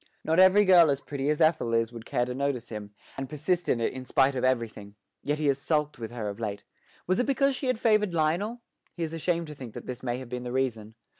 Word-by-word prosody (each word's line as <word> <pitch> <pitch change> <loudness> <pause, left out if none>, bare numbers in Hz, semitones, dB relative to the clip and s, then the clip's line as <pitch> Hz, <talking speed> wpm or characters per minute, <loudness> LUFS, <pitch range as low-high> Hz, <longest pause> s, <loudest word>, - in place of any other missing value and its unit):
Not 160 +2 +2
every 190 +2 +7
girl 175 -4 +7
as 140 -1 +1
pretty 140 0 -3
as 150 +2 0
Ethel 155 -7 +3
is 115 0 +1
would 115 -1 -10
care 120 - 0
to 125 - -4
notice 135 -3 -2
him, 105 -2 -6 0.3
and 135 -1 -4
persist 170 +4 -1
in 115 - +2
it 115 - 0
in 130 0 -6
spite 135 +1 +2
of 130 - -3
everything; 115 -5 -1 0.3
yet 145 +1 -1
he 155 - -2
has 140 -1 +2
sulked 150 -1 -1
with 115 -1 -5
her 115 -3 -5
of 100 +1 -5
late. 100 -3 -4 0.4
Was 185 +5 +1
it 245 - +1
because 275 0 +2
she 260 - -4
had 255 - +1
favoured 215 -4 +2
Lionel? 175 +9 0 0.3
He 170 - -3
is 160 0 -4
ashamed 170 +1 -1
to 150 - -8
think 130 -6 -10
that - - -7
this 125 -1 -6
may 120 -1 -2
have 130 -1 -8
been 125 0 -4
the 125 0 -5
reason. 115 -4 -2
140 Hz, 255 wpm, -28 LUFS, 120-170 Hz, 0.4 s, every